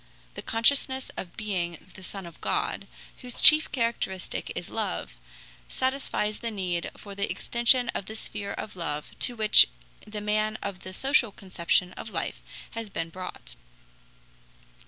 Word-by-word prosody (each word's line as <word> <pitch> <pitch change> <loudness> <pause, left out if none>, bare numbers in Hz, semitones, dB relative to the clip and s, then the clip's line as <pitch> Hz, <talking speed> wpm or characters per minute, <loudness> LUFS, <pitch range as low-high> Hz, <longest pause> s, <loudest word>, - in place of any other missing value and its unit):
The - - -6
consciousness 265 +3 +3
of 175 - -7
being 185 -4 -3
the - - -12
Son 195 0 -6
of 170 -2 -12
God, - - -1 0.3
whose 250 -1 -5
chief 310 0 +8
characteristic 230 -7 -1
is - - -5
love, - - -3 0.5
satisfies 260 -5 -1
the 235 - -2
need 180 -5 -2
for 200 - -9
the 200 0 -2
extension 240 +1 +2
of 195 - -3
the 220 - -6
sphere 205 -2 -5
of 215 - -6
love 150 -4 -3
to 245 - +1
which 215 -2 +7 0.4
the 210 0 -5
man 215 +1 0
of 200 -3 -4
the 185 - -8
social 265 0 +3
conception 180 -2 +1
of - - -7
life - - -3 0.3
had 225 -3 -5
been 165 - -2
brought. 185 +1 -7
210 Hz, 150 wpm, -28 LUFS, 185-235 Hz, 0.5 s, chief